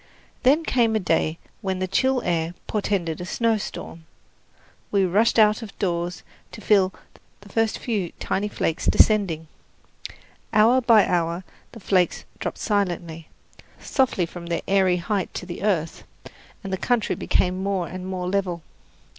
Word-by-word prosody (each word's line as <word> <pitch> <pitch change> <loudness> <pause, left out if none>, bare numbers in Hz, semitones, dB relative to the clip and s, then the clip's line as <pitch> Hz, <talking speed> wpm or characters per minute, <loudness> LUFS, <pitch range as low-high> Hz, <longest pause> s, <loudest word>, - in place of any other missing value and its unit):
Then 285 +6 +4
came 235 -7 +2
a - - +3
day 165 -3 0 0.2
when 190 -1 -2
the 185 0 -2
chill 260 +6 +1
air 170 0 -1
portended 185 -6 -1
a - - -3
snowstorm. 210 -7 -2 0.8
We 195 -2 +2
rushed 210 +7 +2
out 215 +1 +5
of 220 -3 -10
doors 175 -2 -2 0.3
to - - -8
feel 195 -3 +3 0.5
the 205 - -15
first 225 +1 0
few 205 -8 -2
tiny 205 +2 -1
flakes 165 -5 -2
descending. 185 -7 +3 1.1
Hour 225 +4 +5
by 230 -4 +6
hour 170 0 0 0.3
the 230 - -10
flakes 185 -3 +1
dropped - - -4
silently, 175 -6 -2 0.5
softly 260 -10 +1
from 170 +1 -9
their 170 - -2
airy 190 -2 +3
height 190 +2 -2
to - - -4
the 175 -1 -7
earth, 180 -6 -1 0.6
and 195 -1 -5
the - - 0
country 240 +2 0
became 185 +1 0
more 190 -3 -1
and 185 0 -7
more 185 -1 -3
level. 180 -3 -1
190 Hz, 145 wpm, -24 LUFS, 175-215 Hz, 1.1 s, by